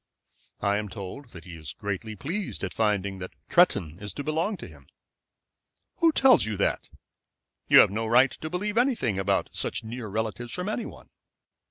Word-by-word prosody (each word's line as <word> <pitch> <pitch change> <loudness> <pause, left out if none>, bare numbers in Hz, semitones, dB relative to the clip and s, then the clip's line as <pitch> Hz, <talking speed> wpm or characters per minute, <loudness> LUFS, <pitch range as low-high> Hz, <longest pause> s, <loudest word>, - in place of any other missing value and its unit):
"I 100 0 +2
am 105 -1 -4
told 110 +7 -8
that 85 -7 -11
he 90 +1 -10
is 80 -3 -8
greatly 105 +1 -4
pleased 170 - -4
at - - -3
finding 100 -3 0
that 95 - -8 0.2
Tretton 95 - +3
is 105 -1 -4
to 145 - -5
belong 165 +7 -1
to - - -9
him." - - -16 1.1
"Who 335 -2 +4
tells 265 - +5
you 110 -2 -3
that? 100 - -1 0.8
You - - +7
have - - +3
no 110 +2 -2
right 125 +4 +5
to 155 - -7
believe 210 +6 -1
anything 225 - +1
about 95 0 0
such - - -1
near 115 +1 -6
relatives 110 +3 -3
from 180 +3 -2
any 220 +1 -2
one. - - -13
110 Hz, 180 wpm, -27 LUFS, -, 1.1 s, You